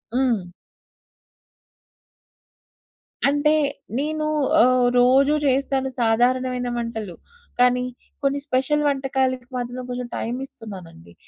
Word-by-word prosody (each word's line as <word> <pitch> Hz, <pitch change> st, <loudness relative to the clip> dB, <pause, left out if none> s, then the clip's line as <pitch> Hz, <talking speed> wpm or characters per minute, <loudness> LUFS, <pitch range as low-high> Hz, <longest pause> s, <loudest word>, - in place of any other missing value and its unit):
హ్మ్. 240 Hz, -8 st, +1 dB, 2.8 s
అంటే 290 Hz, +2 st, +3 dB, 0.5 s
నేను 305 Hz, +1 st, -2 dB, 0.4 s
ఆహ్, 250 Hz, 0 st, +4 dB
రోజూ 265 Hz, +4 st, +5 dB
జేస్తాను 270 Hz, 0 st, +1 dB
సాధారణమైన 250 Hz, +2 st, +1 dB
వంటలు. 220 Hz, -6 st, -4 dB, 0.4 s
కానీ 250 Hz, 0 st, +4 dB, 0.4 s
కొన్ని 275 Hz, +1 st, +1 dB
స్పెషల్ 295 Hz, +2 st, +1 dB
వంటకాలకి 265 Hz, -2 st, 0 dB
మధ్యలో 245 Hz, 0 st, -4 dB
కొంచెం 250 Hz, 0 st, -4 dB
టైమిస్తున్నానండి. 210 Hz, -, -7 dB
255 Hz, 80 wpm, -23 LUFS, 240-270 Hz, 2.8 s, రోజూ